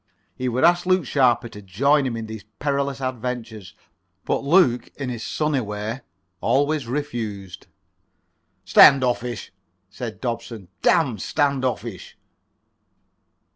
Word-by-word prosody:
He 130 0 -2
would 125 +2 -1
ask 175 +1 +4
Luke 185 -4 +3
Sharper 120 -3 +2
to 105 - -11
join 135 +9 +2
him 115 -2 -3
in 115 - -5
these 110 -1 -8
perilous 140 -1 -1
adventures, 120 -5 -5 0.5
but - - -1
Luke, 140 -5 +3
in 135 -3 -4
his 120 -2 -5
sunny 150 -3 -1
way, 105 +3 -5 0.4
always 145 +2 +1
refused. 115 -9 -5 1.0
"Standoffish," 125 -6 +4 0.4
said 115 0 -7
Dobson. 115 -5 -5
"Damn 130 - +2
standoffish." 130 -6 -2
125 Hz, 110 wpm, -23 LUFS, 110-140 Hz, 1.0 s, ask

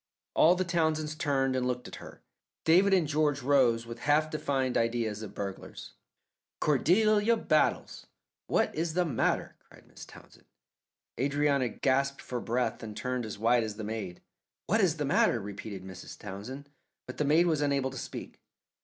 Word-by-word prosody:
All 170 +3 +5
the 185 - 0
Townsends 160 -3 0
turned 140 -4 0
and 125 -1 0
looked 125 0 -3
at - - -9
her. - - -12 0.4
David 185 +5 +5
and 180 -5 +3
George 145 -2 +1
rose 125 -4 +3
with 115 0 -8
a - - -8
half 155 +1 +3
defined 135 -4 -1
idea 115 -1 +1
of 105 0 -8
burglars. 100 -1 -7 0.7
"Cordelia 210 - +3
Battles, 155 -7 0 0.4
what - - +1
is 160 +1 -2
the 180 0 +2
matter?" 135 -9 -1
cried - - -20
Mrs. - - -12
Townsend. - - -17 0.7
Adrianna 140 -1 +1
gasped 135 +4 0
for 125 -2 -4
breath 120 -1 -1
and 105 -2 -8
turned 125 -2 -2
as 105 - -7
white 115 +3 +3
as 110 -1 -5
the 110 - -6
maid. 105 -4 -5 0.4
"What 220 +5 +2
is 170 -5 +2
the 150 - -1
matter?" 130 -3 +3
repeated 100 -1 -7
Mrs. 95 -1 -10
Townsend, 105 +9 -8 0.4
but 125 - -9
the - - +1
maid 155 +4 +4
was 160 -4 +1
unable 140 -2 0
to 135 - -8
speak. - - -8
135 Hz, 170 wpm, -29 LUFS, 115-155 Hz, 0.7 s, All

